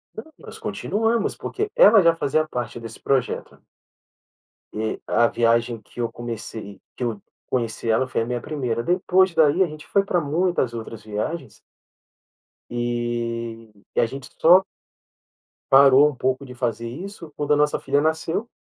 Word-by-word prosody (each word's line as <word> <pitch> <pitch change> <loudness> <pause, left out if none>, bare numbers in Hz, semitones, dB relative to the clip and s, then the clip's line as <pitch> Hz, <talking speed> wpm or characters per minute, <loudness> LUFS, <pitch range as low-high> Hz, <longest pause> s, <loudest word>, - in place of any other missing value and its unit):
Não, 240 +9 -9
nós - - -11
continuamos 225 +2 -1
porque 420 +1 -4
ela - - +7
já 170 -1 +4
fazia 155 0 0
parte 125 -3 -5
desse 115 -1 -9
projeto. 135 -3 -1 1.2
E, 110 0 -2
a 120 - +4
viagem 115 0 +1
que 120 - -9
eu 115 - -1
comecei 110 -3 -7
que 125 - -5
eu 110 -4 -3 0.2
conheci 115 -2 -1
ela 130 +4 +2
foi 125 - -1
a - - -1
minha 120 0 -3
1ª. 125 -7 -2
Depois 185 +3 +2
dali, 160 +3 +4
a 180 - 0
gente 155 -1 -10
foi 200 - +2
pra 185 -2 0
muitas 160 -4 0
outras 115 -2 -7
viagens 110 +4 -5 1.1
e 120 -1 -3 0.3
e - - +2
a - - +3
gente 130 +2 -8
só 180 +4 +7 1.1
parou 135 +1 +7
um 150 - -3
pouco 130 +2 -1
de 125 - -10
fazer 115 -2 -2
isso 170 - -8
quando 145 0 0
a - - +5
nossa 150 0 +2
filha 145 - +1
nasceu. 160 +7 -1
130 Hz, 160 wpm, -23 LUFS, 115-160 Hz, 1.2 s, ela